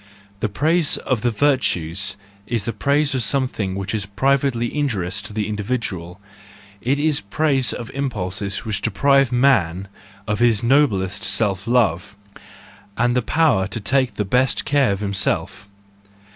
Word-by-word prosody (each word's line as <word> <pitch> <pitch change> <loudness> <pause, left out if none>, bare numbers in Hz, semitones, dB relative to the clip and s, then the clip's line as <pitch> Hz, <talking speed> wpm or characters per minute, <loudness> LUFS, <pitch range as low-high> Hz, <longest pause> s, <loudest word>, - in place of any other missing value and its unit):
The 110 - -1
praise 155 - +1
of 125 -5 -2
the 120 - +1
virtues 100 - 0 0.3
is 115 -4 -2
the 115 - -2
praise 140 +7 +1
of 130 - 0
something 120 -8 0
which 95 +1 -4
is 105 -3 -2
privately 125 +3 0
injurious 105 -12 -1
to - - -8
the 105 -1 -2
individual; 105 -5 -4 0.6
it 135 +4 +1
is 150 -1 +1
praise 135 +5 0
of 120 0 -6
impulses 100 -7 -3
which 105 -2 -2
deprive 135 +3 +2
man 100 -8 +2 0.4
of 105 0 -1
his 115 -3 +3
noblest 110 -8 +2
self 100 -2 +1
love, 105 -5 +1 0.8
and 120 +1 +1
the 125 - +2
power 145 - +2
to 105 +3 -4
take 125 +1 +1
the 105 - -2
best 125 +5 +1
care 140 -4 +2
of 100 0 -3
himself. 95 -1 -2
115 Hz, 145 wpm, -21 LUFS, 100-135 Hz, 0.8 s, his